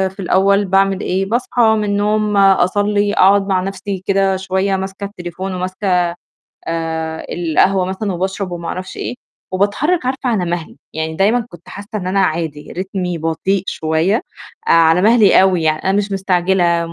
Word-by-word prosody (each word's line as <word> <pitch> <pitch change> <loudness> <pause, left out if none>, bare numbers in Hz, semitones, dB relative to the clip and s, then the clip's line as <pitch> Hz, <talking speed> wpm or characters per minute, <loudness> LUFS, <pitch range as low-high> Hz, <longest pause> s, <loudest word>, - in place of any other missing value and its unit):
في - - -19
الأول 195 +2 +2
باعمل 195 0 +2
إيه، 190 +1 -1
باصحى 240 +3 -1
من 220 -2 +3
النوم 210 0 0
أصلّي، 205 +2 +3
أقعُد 195 +1 +4
مع 190 -2 +1
نَفْسي 195 -1 -5
كده 195 -1 +2
شوية 190 +1 -1
ماسكة 190 +1 -5
التليفون 185 -1 -6
وماسكة 185 0 0 0.6
آآ، 160 -1 -3
القهوة 175 +3 +2
مثلًا 190 +2 -3
وباشرب 190 +2 -3
وما 170 -1 -5
أعرفش 185 0 -6
إيه، 115 - -4 0.4
وباتحرّك 250 - 0
عارفة 260 +1 -2
على 205 -6 0
مَهلي، 170 -2 -4 0.2
يعني 160 0 -3
دايمًا 220 +5 +2
كنت 175 0 -15
حاسّة 200 +1 -9
إن 190 -4 -3
أنا 195 +1 +1
عادي، 160 -4 -2
رتمي 185 -1 -3
بطيء 165 +4 -1
شوية، 160 +8 0 0.4
على 165 +1 +4
مَهلي 215 -3 +5
أوي، 185 -3 +2
يعني 155 -1 0
أنا 190 - +2
مش 205 0 -2
مستعجلة 180 -3 +1
190 Hz, 155 wpm, -17 LUFS, 175-200 Hz, 0.6 s, مَهلي